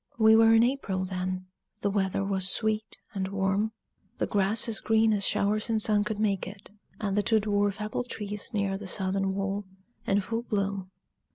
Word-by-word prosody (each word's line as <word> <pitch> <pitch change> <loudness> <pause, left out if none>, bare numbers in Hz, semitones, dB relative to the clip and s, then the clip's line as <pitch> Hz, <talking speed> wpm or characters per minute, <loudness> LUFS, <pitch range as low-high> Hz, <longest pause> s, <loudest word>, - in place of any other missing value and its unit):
We 220 -1 +6
were 225 0 +6
in 225 - +6
April 225 -8 0
then, 185 0 -3 0.4
the 200 - +1
weather 195 -1 0
was 190 -1 +1
sweet 220 +2 -1 0.2
and 190 -2 -2
warm, 195 +2 0 0.5
the - - 0
grass 205 +3 +2
as 225 -1 0
green 220 0 +3
as 200 -1 0
showers 210 +3 +1
and 225 -1 +2
sun 210 -1 +3
could 210 0 -3
make 205 -3 0
it, 200 +1 -10 0.3
and 200 -3 -1
the 210 - +3
two 220 +1 +3
dwarf 205 -1 0
apple 215 +3 -2
trees 210 -4 -6
near 200 -2 -1
the 205 - -7
southern 190 0 -1
wall 195 0 -2 0.4
in 200 0 +3
full 225 +4 -2
bloom. 200 -4 -2
205 Hz, 185 wpm, -28 LUFS, 195-220 Hz, 0.5 s, We